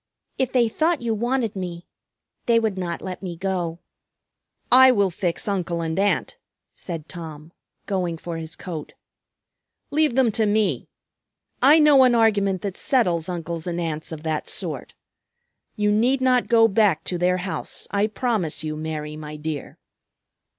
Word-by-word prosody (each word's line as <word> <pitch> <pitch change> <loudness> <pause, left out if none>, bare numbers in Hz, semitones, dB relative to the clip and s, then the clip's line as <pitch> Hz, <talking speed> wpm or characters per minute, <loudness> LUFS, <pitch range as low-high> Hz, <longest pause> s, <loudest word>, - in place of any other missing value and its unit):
If 260 -1 0
they 245 -3 +3
thought 315 +5 0
you 230 -1 0
wanted 235 0 -1
me, 175 -2 -5 0.6
they 230 -1 +5
would 220 -3 -1
not 175 -2 -4
let 185 -1 -6
me 180 -3 -5
go." 175 -3 -2 0.9
"I 260 +1 +9
will 200 -5 +2
fix 175 +4 -2
Uncle 180 -4 -1
and 160 +2 -2
Aunt," 205 +1 0 0.3
said 165 -4 -7
Tom, 160 -2 -9 0.3
going 180 -4 -2
for 165 0 -6
his 160 0 -6
coat. 160 -4 -7 1.0
"Leave 300 -4 +2
them 260 -4 +3
to 220 0 +1
me. 210 0 0 0.7
I 285 +5 +7
know 300 -3 +6
an 250 -2 +5
argument 200 -4 +2
that 195 -2 -4
settles 180 - +1
uncles 170 -1 -4
and 175 0 -2
aunts 160 -2 -4
of 155 -1 -7
that 155 -1 -2
sort. - - -4 0.8
You 210 -2 +1
need 240 +6 +2
not 255 -1 +2
go 225 -1 +5
back 200 -6 +2
to 175 -1 -2
their 180 +1 +2
house, 185 +1 -4
I 200 +1 +2
promise 215 - -1
you, 155 -1 -3
Mary, 155 -1 -5
my 150 0 -8
dear." 150 -1 -6
190 Hz, 155 wpm, -23 LUFS, 165-230 Hz, 1.0 s, I